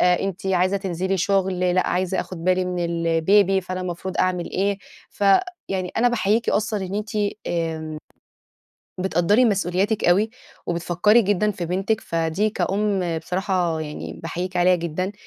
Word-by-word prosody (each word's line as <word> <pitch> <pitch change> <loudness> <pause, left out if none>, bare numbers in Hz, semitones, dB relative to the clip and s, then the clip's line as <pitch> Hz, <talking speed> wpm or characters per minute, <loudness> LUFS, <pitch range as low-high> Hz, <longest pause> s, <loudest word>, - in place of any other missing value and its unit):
أنتِ 180 +1 +1
عايزة 185 +1 +2
تنزلي 190 0 -2
شغل، 190 0 +1
لأ 185 - +2
عايزة 185 +1 0
آخد 170 -3 -7
بالي 185 0 +2
من 180 -1 -2
الBaby، 170 +4 +2
فأنا 185 0 -4
المفروض 185 +1 -4
أعمل 180 -2 0
إيه، 200 +1 0 0.3
ف 205 - -3 0.4
يعني 185 -2 -2
أنا 245 +2 +4
باحييكِ 225 -1 +1
أصلًا 210 -1 0
إن 190 - -6
أنتِ 210 +1 -3 0.4
آمم، 160 -2 -3 1.0
بتقدَّري 190 +6 +3
مسؤولياتِك 200 0 +1
أوي، 200 +6 +3 0.4
وبتفكّري 175 +6 +3
جدًا 205 +1 +1
في 180 -4 -4
بنتِك، 195 +5 0
فدي 165 +6 0
كأُم 190 -3 0
بصراحة 180 -2 -1
يعني 150 +1 -6
باحييكِ 180 +2 -4
عليها 180 +1 +4
جدًا، 175 +3 -3
185 Hz, 140 wpm, -23 LUFS, 175-200 Hz, 1.0 s, أنا